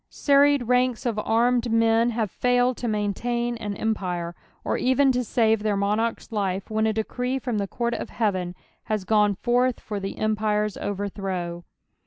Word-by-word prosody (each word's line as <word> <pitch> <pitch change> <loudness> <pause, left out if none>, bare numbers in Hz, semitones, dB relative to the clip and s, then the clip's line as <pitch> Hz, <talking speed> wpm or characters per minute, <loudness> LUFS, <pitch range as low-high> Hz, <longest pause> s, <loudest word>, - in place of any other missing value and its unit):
Serried 285 -1 +3
ranks 250 0 +1
of 225 -3 0
armed 235 +2 +2
men 225 +1 +3
have 220 -4 -2
failed 245 0 +2
to 245 - -3
maintain 235 +3 -1
on 205 -1 -3
empire, 180 -6 -2 0.3
or - - -1
even 265 +2 +3
to 250 0 0
save 225 -2 +2
their 210 -1 0
monarch's 210 +5 -1
life 195 -2 -2
when 220 0 +1
a - - +2
decree 250 +4 -2
from 245 -4 -2
the 200 - -1
court 235 +3 -2
of - - -4
heaven 185 -5 -1 0.3
has 215 -2 -1
gone 210 0 +3
forth 245 +4 +1
for 210 -2 -5
the 195 0 -5
empire's 210 -1 0
overthrow. 190 -4 -4
220 Hz, 165 wpm, -25 LUFS, 205-245 Hz, 0.3 s, Serried